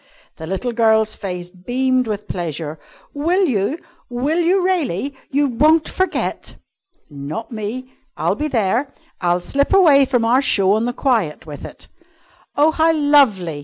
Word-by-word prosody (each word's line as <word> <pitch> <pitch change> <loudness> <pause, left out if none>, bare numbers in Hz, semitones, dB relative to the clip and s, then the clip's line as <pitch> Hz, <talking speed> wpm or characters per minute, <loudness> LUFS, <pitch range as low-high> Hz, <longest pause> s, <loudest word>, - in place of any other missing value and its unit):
The 160 - -8
little 195 +7 -3
girl's 220 -2 +2
face 180 -3 -6
beamed 250 +6 -1
with 210 -1 -4
pleasure. 160 -3 -5 0.3
"Will 345 +7 +1
you? 245 - 0 0.3
Will 270 +7 -1
you 360 +2 +2
really? 285 - -1 0.2
You 285 +1 +1
won't 305 +6 +3
forget?" 375 0 -2 0.5
"Not 150 - -7
me! 235 +4 -6 0.2
I'll - - 0
be 305 - -2
there. 240 +2 0 0.3
I'll 175 0 +1
slip 280 +10 -1
away 295 -8 +6
from 245 -3 0
our 250 +4 +3
show 195 -8 +2
on 220 +2 +1
the 245 - -1
quiet 230 - -1
with 150 -2 -9
it." - - -12 0.7
"Oh, 300 +2 +4
how 320 +1 +2
lovely! 265 - +2
245 Hz, 150 wpm, -19 LUFS, 190-290 Hz, 0.7 s, away